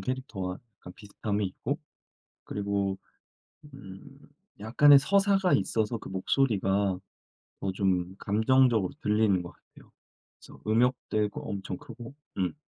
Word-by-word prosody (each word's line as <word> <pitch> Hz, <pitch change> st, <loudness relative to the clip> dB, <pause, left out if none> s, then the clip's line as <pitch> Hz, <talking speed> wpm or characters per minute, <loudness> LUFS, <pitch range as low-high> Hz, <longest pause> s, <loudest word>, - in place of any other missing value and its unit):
캐릭터와 110 Hz, -8 st, -4 dB, 0.2 s
약간 90 Hz, -, -11 dB
비슷함이 105 Hz, +1 st, -3 dB
있고 95 Hz, -, -4 dB, 0.7 s
그리고 100 Hz, -1 st, -2 dB, 0.8 s
음 135 Hz, +4 st, -12 dB, 0.4 s
약간의 140 Hz, +7 st, +6 dB
서사가 195 Hz, +3 st, +2 dB
있어서 110 Hz, +3 st, 0 dB
그 -, -, -10 dB
목소리가 95 Hz, -2 st, +1 dB, 0.6 s
더 95 Hz, -, -2 dB
좀 95 Hz, -1 st, 0 dB
감정적으로 110 Hz, -1 st, +2 dB
들리는 105 Hz, -3 st, +2 dB
것 85 Hz, -, -9 dB
같아요. -, -, -21 dB, 0.5 s
그래서 -, -, -15 dB
음역대고 110 Hz, -2 st, 0 dB
엄청 95 Hz, -2 st, -4 dB
크고 120 Hz, +1 st, -11 dB, 0.2 s
음. 95 Hz, -2 st, 0 dB
105 Hz, 265 characters per minute, -28 LUFS, 95-125 Hz, 0.8 s, 약간의